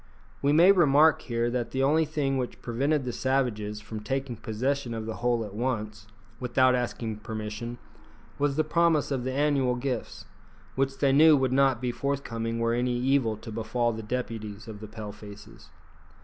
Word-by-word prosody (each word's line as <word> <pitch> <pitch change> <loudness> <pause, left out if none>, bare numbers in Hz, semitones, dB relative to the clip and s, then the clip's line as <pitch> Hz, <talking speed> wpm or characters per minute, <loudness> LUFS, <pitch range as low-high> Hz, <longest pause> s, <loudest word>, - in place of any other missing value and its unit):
We 140 - +2
may 170 +6 +7
remark 155 -4 +5
here 120 -1 -1
that 120 -1 -2
the 135 0 -1
only 155 +4 +3
thing 145 -3 -1
which 125 - -5
prevented 135 +4 0
the 125 - -3
savages 115 -6 -1
from 110 +1 -7
taking 135 +2 -3
possession 120 +3 -2
of 110 -1 -4
the 110 - -5
whole 120 -2 0
at 100 - -10
once, 105 -3 -3 0.3
without 130 +1 +3
asking 120 -3 -2
permission, 110 +2 -6 0.6
was 145 -1 +1
the 155 - +2
promise 160 -2 +2
of 130 -3 -1
the 130 - -1
annual 135 -2 +1
gifts, 125 -1 -4 0.5
which 135 0 -1
they 140 -2 +3
knew 150 +2 +7
would 130 -1 +1
not 135 -3 +3
be 125 - 0
forthcoming 115 -4 -3
were 115 0 +1
any 120 0 0
evil 125 -3 +1
to 110 +1 -9
befall 115 +2 -1
the 110 - -5
deputies 110 -2 -5
of 110 -2 -8
the 110 - -8
Pale 105 -1 -7
faces. 105 0 -13
125 Hz, 175 wpm, -27 LUFS, 110-135 Hz, 0.6 s, may